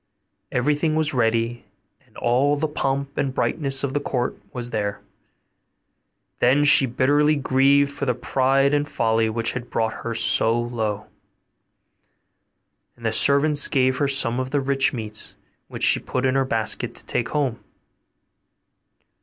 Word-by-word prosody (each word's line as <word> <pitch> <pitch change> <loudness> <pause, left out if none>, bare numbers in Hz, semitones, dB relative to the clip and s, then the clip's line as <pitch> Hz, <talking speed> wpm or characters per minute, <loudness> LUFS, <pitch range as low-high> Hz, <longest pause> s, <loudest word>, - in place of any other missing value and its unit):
Everything 150 +5 0
was 155 -1 0
ready, 115 -1 0 0.4
and - - -19
all 130 +5 +1
the 155 +2 -1
pomp 140 -1 -3
and 135 -2 -2
brightness 135 -4 0
of 135 -1 -2
the 145 - 0
court 125 -3 -3 0.2
was 120 -1 -6
there. 105 -2 -3 1.4
Then 140 +4 +3
she 140 -2 +6
bitterly 145 +5 +2
grieved 140 +1 +2
for 140 -1 -5
the 125 - +1
pride 135 +3 +1
and 145 0 0
folly 110 -1 0
which 115 +1 -1
had 125 -1 -7
brought 115 -1 -1
her 115 -1 -4
so 115 +1 +2
low. 110 -3 -3 1.9
And 115 - -13
the 110 - 0
servants 145 +3 +4
gave 130 -2 +1
her 140 - +1
some 130 -3 +2
of 130 0 -3
the 145 +1 0
rich 135 -1 +1
meats, 110 -4 -7 0.3
which - - -4
she - - +5
put 130 0 -3
into 130 +1 +2
her 135 - 0
basket 115 0 -2
to - - -9
take 120 - -2
home. 140 -6 -2
130 Hz, 150 wpm, -22 LUFS, 120-140 Hz, 1.9 s, she